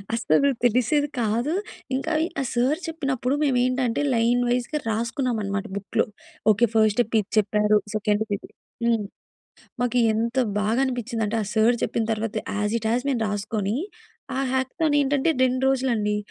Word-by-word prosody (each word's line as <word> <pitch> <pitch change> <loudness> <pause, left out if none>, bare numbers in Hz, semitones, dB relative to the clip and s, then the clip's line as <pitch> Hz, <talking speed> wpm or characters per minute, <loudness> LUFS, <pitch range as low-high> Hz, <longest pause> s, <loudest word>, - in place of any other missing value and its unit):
అసలు 230 - +2 0.2
తెలిసేది 250 +5 +2
కాదు. 235 +8 0 0.4
ఇంకా 315 +5 -2
ఈ - - -2
ఆ - - 0
సార్ 260 +7 +1
చెప్పినప్పుడు 275 -4 -1
మేమేంటంటే 255 -1 +1
లైన్ 235 +1 +2
వైస్‌గా 250 +5 0
రాసుకున్నామన్నమాట 220 -3 -1
బుక్‌లో. 200 -1 0 0.5
ఓకే. 230 +4 +3
ఫస్ట్ 215 -2 +4
స్టెప్ 230 -2 0
ఇది 200 - -4
చెప్పారు. 210 0 +3 0.2
సెకండ్ 210 0 +1
ఇది. - - -14 0.4
హ్మ్. 225 -3 +2 0.8
మాకు 245 0 0 0.2
ఎంత 230 +3 -1 0.2
బాగా 220 +4 +1
అనిపించిందంటే 230 -3 -2
ఆ - - -3
సార్ 225 +2 +4
చెప్పిన 225 - -1
తరువాత 220 0 -3 0.2
యాస్ 210 +2 0
ఇట్ 220 0 -2
యాస్ 245 +2 0
మేము 240 -4 0
రాసుకొని, 205 +1 -2 0.6
ఆ - - +1
హ్యాక్‌తాన్ 290 +4 0
ఏంటంటే. 285 +3 +2
2 255 +1 0
రోజులండి. 235 -6 0
235 Hz, 145 wpm, -24 LUFS, 215-260 Hz, 0.8 s, ఫస్ట్